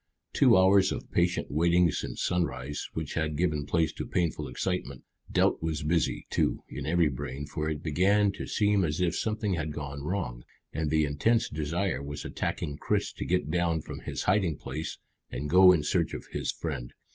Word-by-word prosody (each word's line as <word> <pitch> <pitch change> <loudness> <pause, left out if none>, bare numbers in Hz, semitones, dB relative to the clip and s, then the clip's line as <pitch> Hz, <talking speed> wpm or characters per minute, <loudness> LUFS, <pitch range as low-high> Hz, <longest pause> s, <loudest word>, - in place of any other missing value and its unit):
Two - - +6
hours 95 +1 +5
of - - -5
patient 90 0 +1
waiting 85 +2 +3
since - - -4
sunrise, 75 -5 -2
which 80 -3 -3
had 80 -2 -1
given 75 -4 0
place 80 -2 +1
to - - -5
painful 80 -4 -1
excitement. 70 0 -3 0.3
Doubt - - +2
was 80 -2 -2
busy, 80 +1 0
too, - - 0
in 70 0 -6
every 85 0 +3
brain, 65 +1 -4
for 75 +2 -3
it 75 -1 -4
began 100 +6 +3
to - - -7
seem 105 -2 +2
as 75 -1 -1
if 90 -2 +1
something 110 -2 -1
had 80 -3 -2
gone 70 -1 -5
wrong, 70 -8 -3 0.3
and 80 0 -1
the 80 0 +3
intense 110 +12 +1
desire 80 +1 -1
was 70 +1 -6
attacking 70 -1 -3
Chris - - 0
to - - -5
get 90 -4 0
down 85 -2 +1
from - - -8
his - - -4
hiding 90 -6 +2
place 80 +1 -5 0.3
and 75 +4 -4
go 90 +1 +8
in 85 -5 +2
search 85 +2 0
of - - -7
his - - -1
friend. 70 -7 -5
80 Hz, 185 wpm, -29 LUFS, 75-90 Hz, 0.3 s, go